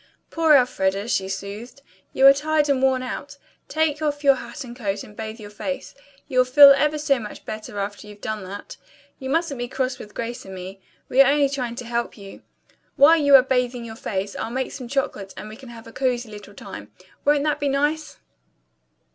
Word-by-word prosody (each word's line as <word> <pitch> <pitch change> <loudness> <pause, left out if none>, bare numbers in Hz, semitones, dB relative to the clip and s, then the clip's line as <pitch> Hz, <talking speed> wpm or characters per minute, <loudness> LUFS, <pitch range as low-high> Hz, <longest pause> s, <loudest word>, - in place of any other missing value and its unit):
"Poor 320 -2 +4
Elfreda," 200 -6 +1
she 190 -5 0
soothed. 200 +7 -7 0.3
"You 265 - +3
are 275 - +10
tired 300 +1 0
and 270 -2 +2
worn 260 -1 +2
out. 285 +3 -6 0.3
Take 315 -1 0
off 295 -1 -2
your 280 -1 +7
hat 265 - -7
and 240 -1 -10
coat 200 -5 -3
and 210 - -14
bathe 220 +1 -6
your 205 -1 -10
face. 270 +5 -5 0.3
You'll 255 -3 +3
feel 280 +2 +9
ever 300 +2 +3
so 285 -3 +1
much 210 -2 -9
better 215 -1 -7
after 205 +1 -5
you've 210 0 -12
done 215 -1 -4
that. 200 +2 -9 0.4
You 265 - -5
mustn't 320 -3 0
be 245 - -3
cross 255 0 -2
with 210 - -11
Grace 235 +1 -5
and 190 0 -9
me. 190 +1 -9 0.3
We 265 - +5
are 275 0 +6
only 285 -1 +3
trying 250 -4 -3
to 245 0 -7
help 235 0 -3
you. 200 -1 -11 0.5
While 310 +4 +7
you 285 -3 +6
are 260 - +8
bathing 250 -2 -1
your 225 -1 -8
face, 195 -2 -4
I'll - - -4
make 260 +2 -3
some 255 -3 -7
chocolate 235 -7 -3
and - - -7
we'll 215 +3 -11
have 230 -1 -11
a 230 - -13
cozy 250 -4 -1
little 205 -1 -11
time. - - -10 0.3
Won't 290 0 +3
that 300 -1 0
be 285 -1 0
nice?" 295 +3 -1
250 Hz, 205 wpm, -23 LUFS, 215-280 Hz, 0.5 s, are